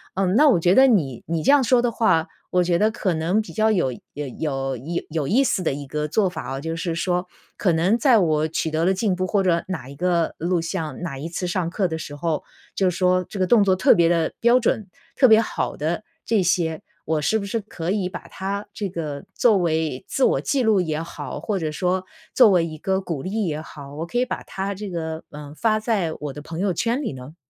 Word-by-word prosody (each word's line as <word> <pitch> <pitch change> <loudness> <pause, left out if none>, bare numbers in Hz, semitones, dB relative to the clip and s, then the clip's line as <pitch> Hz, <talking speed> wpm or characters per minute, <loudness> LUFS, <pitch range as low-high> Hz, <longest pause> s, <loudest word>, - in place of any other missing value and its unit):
嗯， 190 0 +1
那 295 +5 +6
我 220 - +4
觉 175 +2 +3
得 265 +5 +7
你 150 - +1
你 165 0 -1
这 - - +5
样 285 -2 +5
说 245 0 +4
的 240 -1 +1
话， 165 -8 +2 0.2
我 180 0 +2
觉 175 -1 +2
得 215 +2 +4
可 205 -5 -1
能 165 +6 +1
比 220 - -10
较 220 0 +2
有 175 -11 +1 0.2
有 145 -1 -5
有 135 -4 -2 0.3
有 155 -3 -1
意 250 - +3
思 225 - 0
的 - - +1
一 140 +1 -5
个 150 +2 -2
做 195 +6 +2
法 175 -3 -5
啊。 - - -4
就 165 +3 -4
是 165 0 -2
说， 180 +1 -1 0.3
可 185 - +2
能 180 +8 +2
在 255 -2 +5
我 155 -5 +2
取 160 0 -2
得 160 +1 0
了 190 - +3
进 190 0 0
步 185 +1 -1
或 200 0 +1
者 170 -2 +2
哪 180 -9 -5
一 140 - -10
个 170 +1 +1
录 175 +2 +1
像， 165 -2 -4
哪 155 -6 -4
一 150 +5 -5
次 175 +2 -4
上 175 -1 -1
课 190 +2 0
的 160 -2 -3
时 145 -2 -7
候， 155 +1 -2 0.3
就 190 -2 +2
说 180 +1 +2
这 200 - -6
个 185 - +3
动 220 +1 +5
作 190 -2 +3
特 190 - +5
别 170 -1 +4
的 170 -2 +1
标 240 +2 +5
准， 220 -4 0 0.3
特 260 - +6
别 220 -2 +7
好 230 - -2
的 165 +7 -2 0.2
这 220 -3 +2
些， 165 -2 0 0.2
我 155 -1 0
是 220 +9 +2
不 200 - -5
是 215 +3 -2
可 175 -4 -4
以 195 -3 -1
把 - - -8
它 200 +2 -4
这 205 -2 -3
个 155 -5 -5
作 225 -4 +4
为 160 -6 -1
自 270 - -1
我 - - +2
记 270 -3 0
录 215 -4 +3
也 155 -2 -2
好， 165 - -6
或 205 -3 -2
者 155 -3 -2
说 180 +3 0 0.3
作 245 -4 +7
为 180 -4 +3
一 155 -1 -7
个 190 +2 0
鼓 165 -7 -4
励 205 +6 -2
也 155 -3 -2
好， 145 -3 -11
我 160 +2 -4
可 240 - -3
以 250 - +3
把 - - -4
它 195 +1 -4
这 200 +1 -6
个， 160 -2 -4
呃， 145 -1 -9
发 215 +4 +1
在 215 -7 0
我 150 -2 -5
的 145 - -8
朋 165 +2 -7
友 195 -1 +1
圈 235 - 0
里 250 - -3
呢？ 130 +4 -10
180 Hz, 265 characters per minute, -23 LUFS, 160-205 Hz, 0.3 s, 得